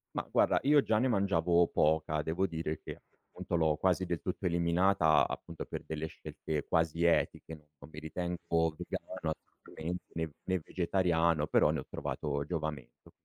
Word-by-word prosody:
Mah, - - -2
guarda, - - +4
io 145 +1 +6
già 110 - +1
ne 130 - +2
mangiavo 90 -5 +3
poca, 75 0 +1
devo 80 +6 0
dire 80 -2 -3
che - - -8 0.3
appunto - - -4
l'ho 80 -2 +3
quasi 95 +1 +1
del 85 -2 -3
tutto 90 +1 -4
eliminata, 85 -1 +3
appunto 85 -1 -6
per - - -6
delle 80 0 -4
scelte 75 -1 -5
quasi 80 +1 +1
etiche, 85 -1 +1
non 75 -1 -17
mi 75 - -8
ritengo 85 0 -1
vegano 90 -4 -4
assolutamente 85 +3 -8
né 80 -2 -2
né 95 -1 0
vegetariano, 85 -4 +1
però - - +4
ne - - -1
ho - - -7
trovato 70 -1 -3
giovamento 75 -7 -5
85 Hz, 160 wpm, -32 LUFS, 80-90 Hz, 0.3 s, io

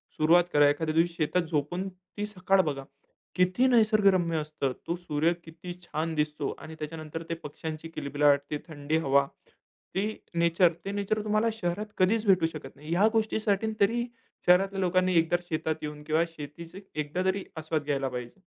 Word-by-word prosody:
सुरुवात 170 +3 +5
करा. 145 -1 +6
एखाद्या 155 +2 -1
दिवशी 170 +1 +3
शेतात 170 +2 +1
झोपून 175 +5 -1
ती 190 +3 -7
सकाळ 195 -2 +2
बघा. 140 -5 -3 0.5
किती 185 +8 +3
निसर्गरम्य 200 -8 +4
असतं. 150 -3 -2 0.2
तो 170 - 0
सूर्य 170 -1 0
किती 165 +2 -8
छान 160 0 -3
दिसतो 150 -1 -1
आणि 160 - -9
त्याच्यानंतर 155 +1 -6
ते - - 0
पक्ष्यांची 155 +2 -6
किलबिलाट, 145 -2 +2
ते, 150 - 0
थंडी 155 0 -1
हवा. 140 -3 +3 0.7
ती 210 +3 -1 0.2
नेचर, 170 +1 +4
ते 195 - -2
नेचर 205 +1 -1
तुम्हाला 215 +2 +2
शहरात 210 +1 -3
कधीच 210 +4 +3
भेटू 185 -4 +5
शकत 155 - -9
नाही. 150 +2 -12
ह्या 185 +6 +4
गोष्टीसाठी 220 -1 +1
तरी 235 +4 +2 0.4
शहरातल्या 195 +2 +4
लोकांनी 185 0 +2
एकदा 165 +2 +2
शेतात 155 0 -1
येऊन 150 -1 -6
किंवा 155 +2 +2
शेतीचे 165 +6 -9 0.2
एकदा 150 +5 -2
तरी 190 +1 +1 0.2
आस्वाद 155 -1 -2
घ्यायला 140 -2 -1
पाहिजे. 125 +8 -7
170 Hz, 160 wpm, -28 LUFS, 150-195 Hz, 0.7 s, करा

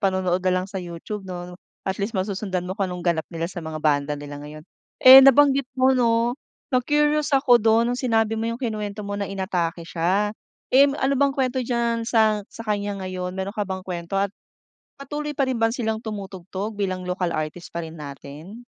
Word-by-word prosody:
panonood 185 -2 +1
na 185 0 +1
lang 185 - -5
sa 195 -1 -5
YouTube 175 +4 -6
'no, 180 0 -7 0.2
at 190 0 -2
least 205 +2 -2
masusundan 190 -1 -2
mo 180 - -4
kung 195 -1 -2
anong 180 -1 -6
ganap 170 -3 0
nila 165 -1 -4
sa 175 +1 -5
mga 160 -1 -6
banda 145 -1 +2
nila 145 0 -8
ngayon. 150 +1 -10 0.4
Eh, 260 +1 +12
nabanggit 275 0 +5
mo 260 +1 +4
'no, 235 -1 +2 0.4
na 255 - +4
curious 295 +2 +2
ako 250 -3 +5
dun 230 +2 +3
nung 245 - -3
sinabi 225 -3 +1
mo 225 +1 -1
'yung 230 - -3
kinuwento 210 -3 -4
mo 200 - -5
na 200 -1 -3
inatake 180 -4 -2
sya. 185 +5 0 0.4
Eh, 275 +2 +7
ano 275 -1 0
bang 280 -1 +2
kwento 260 -1 0
diyan 235 -1 -1
sa 220 -3 +3
sa - - -9
kanya 205 -1 -2
ngayon, 185 0 -4
meron 190 +1 -3
ka 210 -2 -3
bang 190 -1 -4
kwento 175 0 -4
at 200 0 0 0.7
patuloy 295 +2 -4
pa 275 - +2
rin 255 -3 -1
ba 225 - +4
silang 220 -3 -2
tumutugtog 200 -1 -6
bilang 185 -2 -2
local 180 0 -1
artist 155 +3 -4
pa 170 - -2
rin 160 0 -9
natin? 150 - -10
200 Hz, 200 wpm, -23 LUFS, 180-235 Hz, 0.7 s, Eh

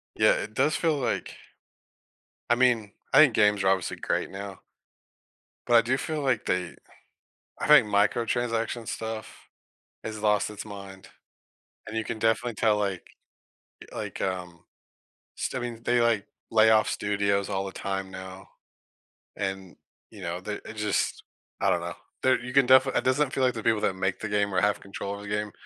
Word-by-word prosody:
Yeah. - - +5
It 110 - -4
does 155 +8 +2
feel 160 -3 +1
like 125 -4 -2 1.2
I 120 - +7
mean, 120 -5 +2 0.2
I 135 - +6
think 145 -7 +7
games 105 -2 +3
are 95 - +2
obviously 95 -2 +1
great - - -1
now. 100 0 -7 1.1
But 120 - +4
I 115 - +8
do 130 +3 0
feel, 155 +2 -3
like, 130 -6 0
they 90 -1 -1 0.8
I - - -2
think 150 -5 +8
microtransaction 115 +2 0
stuff 110 -1 -6 0.6
has 110 -1 -6
lost 105 -1 +2
its 105 -1 -7
mind. 100 -2 -10 0.8
And 110 - -4
you 110 - 0
can 110 +1 -5
definitely 115 +2 +1
tell, 105 0 +2
like 100 -3 -2 0.9
like, - - -6
um, 90 -2 -4 0.7
just, - - -3
I - - -1
mean, 120 -2 -5
they, 120 0 +3
like, 115 -3 +2 0.2
lay 110 0 +5
off 110 -1 +4
studios 100 -1 0
all 95 0 -1
the 95 - -6
time 95 -1 -4
now. 95 0 -9 0.9
And, 95 -2 -4 0.3
you - - -12
know, - - -3
they - - -4
it - - -8
just - - -1 0.4
I - - +3
don't - - +2
know, - - -5 0.3
there 130 - +3
you 125 0 -6
can 135 -2 +5
defi 130 +1 +6
it - - +1
doesn't 130 +2 +2
feel 130 - +1
like 125 - +2
the 110 - -5
people 110 -1 +2
that 95 - +1
make 95 0 -1
the 110 - -3
game 100 -1 0
or - - +3
have 105 0 +2
control 100 0 -6
of 100 - -10
the 105 - -8
game 105 0 -2
105 Hz, 180 wpm, -27 LUFS, 100-120 Hz, 1.2 s, I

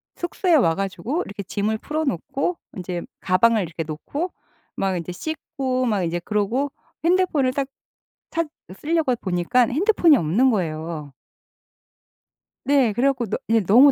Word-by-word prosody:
숙소에 350 0 0
와 165 - +4
가지고 195 - -2
이렇게 200 0 -6
짐을 215 +3 -1
풀어놓고 305 - -2 0.2
인제 180 -1 -4 0.2
가방을 210 +3 +3
이렇게 165 0 -5
놓고 280 - -4 0.4
막 190 -1 0
인제 170 0 -4
씻고 265 - -2
막 205 -5 +1
인제 170 +1 -1
그러고 215 +9 0 0.3
핸드폰을 335 -7 +2
딱 275 -1 -1 0.6
찾 335 -1 0 0.3
쓸려고 310 -5 +1
보니까 185 +6 +1
핸드폰이 340 - +4
없는 225 +11 +3
거예요. 160 -6 -3 1.5
네 270 -6 +4
그래 245 +6 +1
갖고 255 -3 0 0.4
너무 240 +9 +8
235 Hz, 280 characters per minute, -23 LUFS, 180-285 Hz, 1.5 s, 너무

